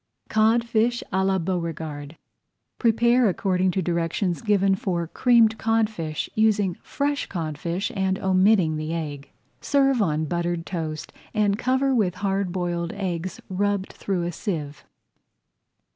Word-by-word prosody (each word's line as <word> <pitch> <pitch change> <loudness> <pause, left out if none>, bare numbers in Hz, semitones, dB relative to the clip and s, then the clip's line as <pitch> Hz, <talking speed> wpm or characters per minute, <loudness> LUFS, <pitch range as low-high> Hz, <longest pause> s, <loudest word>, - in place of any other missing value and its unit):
CODFISH 230 +2 +2
À 190 0 +2
LA 190 0 +2
BEAUREGARD 160 -4 -4 0.6
Prepare 235 0 +4
according 185 -1 +1
to 185 +1 -1
directions 170 +2 -1
given 200 -3 +3
for 180 -3 -1
Creamed 225 +4 +3
Codfish, 215 -9 0
using 210 -4 +2
fresh 285 0 -2
codfish 170 +3 -3
and 190 -1 0
omitting 185 -4 +3
the 155 +2 -3
egg. 145 -4 -5 0.3
Serve 275 -3 +2
on 155 -4 +1
buttered 170 +1 -2
toast 160 -4 -5 0.2
and 205 -1 +2
cover 260 +2 +1
with 200 -7 +1
hard 195 -1 -1
boiled 175 -1 -2
eggs 185 -3 -4
rubbed 200 +1 -1
through 185 -3 -2
a 175 - -2
sieve. 155 -6 -4
190 Hz, 125 wpm, -24 LUFS, 170-215 Hz, 0.6 s, Prepare